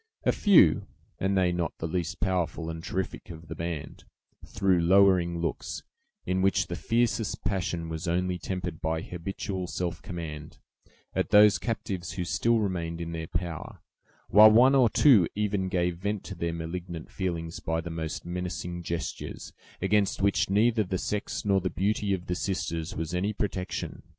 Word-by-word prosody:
A - - +4
few, 175 - +5 0.3
and 95 +1 +1
they 90 -2 +3
not 85 -3 -2
the - - -4
least 85 +3 -3
powerful 85 -3 -1
and 80 0 -7
terrific 95 +2 -4
of 85 -1 -10
the - - -3
band, 85 -2 -5 0.4
threw 95 -3 +1
lowering 90 -1 +4
looks, 85 - -3 0.4
in 95 +1 0
which 95 -2 +3
the 85 - -5
fiercest 115 +2 0
passion 90 -4 -2
was 80 +2 -5
only 90 +1 0
tempered 90 -3 -4
by 80 0 -1
habitual 95 +1 -4
self 90 -1 -3
command, 80 -3 -7 0.6
at - - 0
those 105 0 +7
captives 95 -6 -3
who 90 -2 -3
still 115 +6 +2
remained 85 -5 -2
in 85 -1 -4
their 80 -1 -4
power, 85 -2 -4 0.5
while 105 +1 +9
one 125 +5 +6
or 130 -4 +5
two 110 - +6
even 100 -2 0
gave 90 -1 0
vent 100 +2 -2
to 100 - -7
their 85 -2 -2
malignant 85 0 -6
feelings 85 -3 -3
by 80 0 -1
the 85 0 -5
most 80 -1 -4
menacing 90 0 -4
gestures, 85 -1 -5 0.3
against 105 -2 +2
which 100 -1 +2
neither 110 +3 +3
the 95 -1 -2
sex 105 +3 -3
nor 100 -1 +3
the 95 - -1
beauty 100 +4 0
of 90 -2 -1
the 90 - -2
sisters 85 -3 -3
was 80 +1 -4
any 100 +4 0
protection. 95 -3 -3
90 Hz, 165 wpm, -28 LUFS, 85-100 Hz, 0.6 s, while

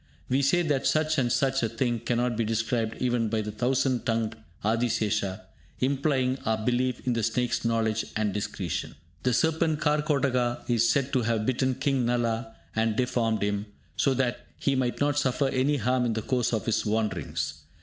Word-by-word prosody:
We 130 +2 +2
say 155 +6 +3
that 145 -5 +1
such 155 -1 +2
and 120 -2 +1
such 135 +2 +2
a 115 - 0
thing 120 0 -1
cannot 120 +1 0
be 115 - 0
described 115 0 -1
even 120 -3 +1
by 110 0 0
the 105 0 -4
thousand 125 +2 +1
tongued 115 -2 0 0.3
Adisesha, 110 -3 0 0.4
implying 135 -1 +1
our 110 0 +1
belief 125 0 0
in 125 - +1
the 115 - 0
snake's 120 +2 0
knowledge 115 -1 +1
and 105 -2 0
discretion. 100 -3 -3 0.3
The 125 - +1
serpent 160 +4 +2
Karkotaka 140 -5 +1
is 115 -2 +3
said 140 +1 +1
to 130 - +3
have 110 -2 0
bitten 130 +1 +1
King 135 -1 0
Nala 115 -2 -1 0.2
and 110 -1 +1
deformed 115 -4 0
him, 100 +1 -1 0.3
so 135 -2 +2
that 125 -2 -1
he 140 - +1
might 125 -2 0
not 145 0 +2
suffer 135 +1 +1
any 135 +2 +1
harm 125 +1 +1
in 115 - 0
the 110 -1 -3
course 125 -2 0
of 110 -4 -1
his 115 - +1
wanderings. 95 -8 -2
120 Hz, 180 wpm, -27 LUFS, 110-130 Hz, 0.4 s, say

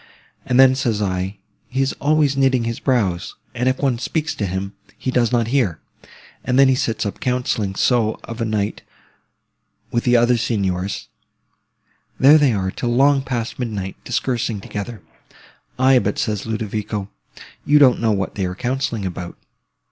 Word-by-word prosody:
And 125 0 +2
then, 130 -1 +7
says 120 -5 -1
I, 95 0 -2 0.3
he 135 +2 0
is 135 - -1
always 150 -1 +2
knitting 130 -3 +2
his 115 0 -3
brows; 100 -9 0 0.2
and 125 +1 +1
if 130 - 0
one 130 -4 0
speaks 155 +4 -2
to 100 - -3
him, 95 +2 -4 0.2
he 130 - -3
does 120 -2 +2
not 115 -2 +1
hear; 120 - +1 0.6
and 125 - 0
then 135 0 +7
he - - +5
sits 115 -4 -1
up 100 - -4
counselling 125 -6 -1
so, 115 0 +1
of 115 0 -7
a - - +1
night, 105 -2 -2 1.1
with 120 - 0
the 120 -1 +4
other 120 +1 +3
Signors—there 100 +7 -1
they 145 -3 +4
are, 95 -3 -1
till 120 - -3
long 135 +3 +4
past 120 -3 -4
midnight, 105 -6 -4
discoursing 120 -4 -1
together! 105 +3 -6 0.7
Aye, 130 0 +5
but - - -2
says 105 -2 -2
Ludovico, 105 -2 -3 0.5
you 150 - +4
don't 130 -5 +5
know 115 -1 +2
what 95 -2 -1
they 95 - -2
are 90 0 -4
counselling 120 -2 -2
about. 90 -1 -6
115 Hz, 165 wpm, -20 LUFS, 100-130 Hz, 1.1 s, then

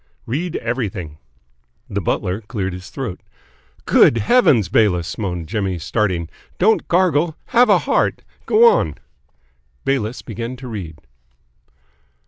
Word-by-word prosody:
"Read 160 +8 -3
everything." 95 - -4 0.7
The - - -3
butler 95 +4 -1
cleared 100 -4 -4
his 90 +1 -9
throat. 125 -10 -5 0.6
"Good 115 - +5
Heavens, 115 - +4
Bayliss," 90 -6 +1
moaned 90 -6 -3
Jimmy, 100 -3 -2
starting, 90 -1 -1 0.3
"don't 220 +4 +2
gargle. 170 -3 +2
Have 245 -1 +4
a 205 - +6
heart! - - 0 0.2
Go 455 +2 +6
on!" 460 - +2 0.9
Bayliss 125 -4 -1
began 115 +2 -5
to 130 0 -9
read. 95 -9 -6
110 Hz, 115 wpm, -19 LUFS, 95-145 Hz, 0.9 s, a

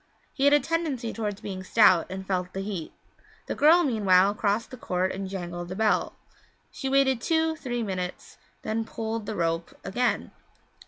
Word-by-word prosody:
He 275 - 0
had 285 - +6
a - - +5
tendency 295 -8 -2
toward 210 -3 -3
being 185 -2 -5
stout, 185 -4 +5
and 190 +1 -6
felt 185 -1 -2
the 195 - -3
heat. 195 -5 -5 0.5
The - - -3
girl, 330 +4 +5
meanwhile, 200 - +4
crossed 210 +3 -1
the - - -6
court 185 -4 -1
and 195 0 -5
jangled 175 -2 -5
the 185 - -6
bell; 215 +1 +1 0.6
she 270 - -4
waited 265 -3 +3
two 320 +1 +1
three 245 -5 -3
minutes, 185 -3 -5 0.2
then 225 +1 -1
she - - -16
pulled 225 -1 -4
the 215 - -3
rope 165 -1 -1
again. 240 +6 -1
210 Hz, 175 wpm, -26 LUFS, 185-255 Hz, 0.6 s, had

